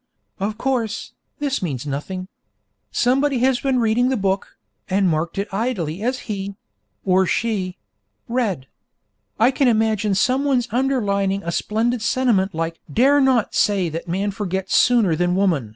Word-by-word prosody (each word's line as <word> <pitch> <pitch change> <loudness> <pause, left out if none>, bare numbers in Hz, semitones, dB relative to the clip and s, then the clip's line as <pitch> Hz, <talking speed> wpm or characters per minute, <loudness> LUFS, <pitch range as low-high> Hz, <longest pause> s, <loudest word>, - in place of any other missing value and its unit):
Of 210 +2 -2
course, 235 -4 -2 0.2
this 285 -2 -1
means 145 -8 -3
nothing. 185 +7 -4 0.6
Somebody 270 - +2
has 260 -1 +3
been 265 0 +1
reading 240 +2 +2
the 265 - 0
book, 195 -1 -2 0.3
and 195 0 +2
marked 165 +1 -1
it 200 +1 -1
idly 195 -6 -2
as 250 +3 -1
he 200 -2 -4 0.5
(or 190 0 +3
she) 195 -6 -1 0.5
read. 225 - -1 0.7
I 235 +4 +5
can 270 0 +2
imagine 220 -3 +2
someone's 255 +3 +2
underlining 200 -6 0
a 170 - -3
splendid 225 +5 0
sentiment 215 -6 +1
like 165 0 -3
'Dare 280 - +4
not 260 -5 +2
say 195 -4 +2
that 165 +2 -6
man 195 +4 -1
forgets 190 -1 -2
sooner 230 -9 +4
than 175 +2 +1
woman!' 170 - +1
205 Hz, 145 wpm, -21 LUFS, 185-245 Hz, 0.7 s, I